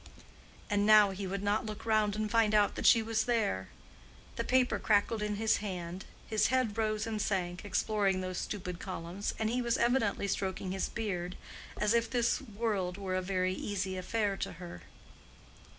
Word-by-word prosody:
And 205 -1 +1
now 210 -2 +7
he 195 0 -5
would 195 +1 -3
not 205 +2 0
look 215 0 -7
round 215 -2 +2
and 215 0 -2
find 225 -2 +3
out 205 -1 +4
that - - 0
she 230 -2 +6
was 220 -1 0
there! 215 - 0 0.7
The - - -1
paper 255 -1 +2
crackled 215 +1 +2
in 210 0 -1
his 220 +1 +2
hand, 185 -3 -5 0.2
his 215 - +2
head 255 -5 +1
rose 215 -1 0
and 220 -2 -2
sank, 180 -3 -1
exploring 205 -1 +1
those 185 -1 -3
stupid 180 -4 -5
columns, 185 +1 -4
and 220 - 0
he 245 +3 0
was 235 -1 +1
evidently 230 -5 +1
stroking 190 -1 -2
his 190 0 -2
beard; 180 -5 -3 0.4
as 210 +1 +2
if 230 0 +2
this 240 -2 +1
world 205 -6 -2
were 195 -2 -4
a 185 - +1
very 185 0 0
easy 190 -1 -3
affair 200 +2 -1
to - - -4
her. 175 - -9
205 Hz, 180 wpm, -32 LUFS, 185-220 Hz, 0.7 s, now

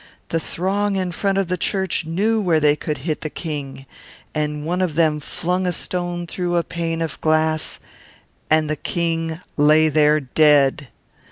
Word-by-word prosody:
The 165 - 0
throng 195 +5 -1
in 185 -2 -1
front 195 +3 0
of 195 - +2
the 180 0 -2
church 190 -4 -1
knew 215 +7 +1
where 170 -5 +2
they 150 -1 +4
could 150 -1 -4
hit 155 -3 -1
the 155 - -3
King, 140 -5 -5 0.5
and 150 -1 -2
one 180 +3 -1
of 175 -5 -1
them 155 -2 +2
flung 180 +5 -2
a - - +2
stone 175 0 -3
through 175 +1 -2
a 170 - +2
pane 165 -1 -3
of 160 - -6
glass, 155 0 +1 0.7
and 155 0 +3
the 155 - -1
King 165 +1 -2 0.2
lay 155 +2 +5
there 150 0 +4
dead! 145 0 +3
165 Hz, 170 wpm, -21 LUFS, 150-180 Hz, 0.7 s, lay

